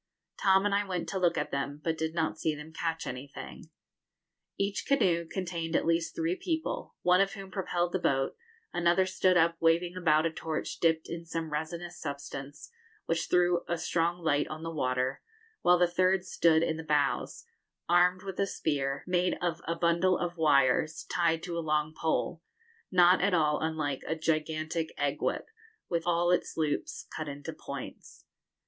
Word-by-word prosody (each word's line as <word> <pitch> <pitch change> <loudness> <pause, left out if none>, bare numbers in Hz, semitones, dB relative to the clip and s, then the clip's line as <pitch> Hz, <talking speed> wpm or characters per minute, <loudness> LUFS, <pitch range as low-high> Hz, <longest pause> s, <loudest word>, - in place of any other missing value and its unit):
Tom 190 0 +4
and 205 - +2
I 200 +1 +3
went 185 -3 -3
to 190 - -2
look 175 -2 +2
at - - -2
them, 140 +1 -3
but 165 -1 0
did 160 0 -3
not 160 -2 -1
see 155 -1 0
them 150 +2 -10
catch 165 0 -2
anything. 130 +3 -8 0.9
Each 200 0 -1
canoe 175 -11 +2
contained 170 -2 -3
at - - +2
least 165 0 +1
three 335 +2 0
people, 365 +6 -3
one 180 +1 +5
of 195 0 +1
whom 195 -2 -9
propelled 175 -3 -1
the 185 - 0
boat, 135 -5 +1 0.4
another 175 +2 +3
stood 185 -1 +2
up 165 0 +3
waving 170 +2 +2
about 160 -3 +3
a 165 - +1
torch 160 -1 -4
dipped 160 -1 +2
in 170 0 -5
some 165 -2 -4
resinous 170 +3 -4
substance, 140 - -7 0.3
which 165 0 -1
threw 175 -1 +3
a 170 - -1
strong 170 +1 0
light 145 -2 +2
on 155 +1 -7
the 165 - -4
water, 130 -3 -1 0.4
while 180 0 +5
the 175 - +5
third 185 +1 +2
stood 165 -1 +3
in 160 -1 0
the 160 - -6
bows, 150 -3 0 0.4
armed 180 +1 +4
with 195 -2 -6
a 200 - +2
spear, 140 -5 -1
made 180 0 +1
of 170 -2 -2
a 170 - 0
bundle 170 +2 +2
of 175 0 -3
wires, 155 -1 +3
tied 165 -2 +1
to 175 -2 -4
a - - -1
long 155 -1 0
pole, 160 +1 -1 0.5
not 180 0 +5
at 195 0 +3
all 150 -3 +2
unlike 155 -4 -2
a 160 - 0
gigantic 160 0 -1
egg - - -1
whip, - - -1 0.4
with 170 -1 -1
all 175 0 +3
its 180 - 0
loops 155 -2 -2
cut 155 - -4
into 145 0 -6
points. - - -9
165 Hz, 180 wpm, -30 LUFS, 155-180 Hz, 0.9 s, one